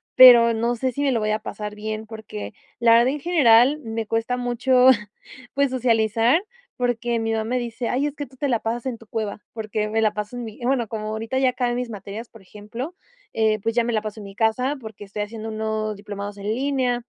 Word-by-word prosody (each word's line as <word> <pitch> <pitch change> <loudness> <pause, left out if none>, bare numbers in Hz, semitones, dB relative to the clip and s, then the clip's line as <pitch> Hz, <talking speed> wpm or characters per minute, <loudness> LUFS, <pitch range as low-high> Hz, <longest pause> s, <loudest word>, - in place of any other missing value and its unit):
pero 240 -2 +9
no 235 +2 0
sé 255 +2 -1
si 280 - -4
me 280 -2 +2
lo 230 - 0
vaya 215 0 +1
a 215 - -3
pasar 210 0 -6
bien 215 +1 -5
porque 215 - -8 0.3
la 235 -1 +5
verdad 235 +1 +6
en 285 +3 -1
general 275 -4 +5
me 225 -3 -4
cuesta 225 +3 -1
mucho, 250 +1 +3 0.6
pues, 280 0 +2
socializar 230 - +2 0.4
porque 240 -1 0
mi 225 0 -1
mamá 220 -1 0
me 250 +3 -1
dice: 235 0 -4
"Ay 265 +3 +1
es 290 - -6
que 290 - -5
tú 265 - -19
te 285 +2 -1
la 235 -3 +2
pasas 230 +2 -3
en 255 -3 -3
tu 225 - -17
cueva". 215 -2 -4
Porque 215 -1 -2
me 225 +1 +1
la 215 -1 +2
paso 210 +2 -5
en 245 - -4
mi 220 -2 -10
bueno 245 -2 +1
como 215 -1 -4
ahorita 225 +4 -3
ya 265 -1 +4
acabé 245 -1 -1
mis 245 -1 -3
materias 210 +2 -7
por 225 - -16
ejemplo, 215 - -8 0.4
eh, 220 -1 +2
pues, 225 +2 -1
ya 240 - +3
me 240 - -1
la 215 - +1
paso 215 0 -6
en - - -9
mi 195 0 -11
casa 235 +6 +1
porque 220 -2 -9
estoy 205 +1 -5
haciendo 220 +1 -7
unos 215 0 -2
diplomados 205 0 -7
en 200 0 -6
línea, 255 -2 0
225 Hz, 230 wpm, -23 LUFS, 215-250 Hz, 0.6 s, pero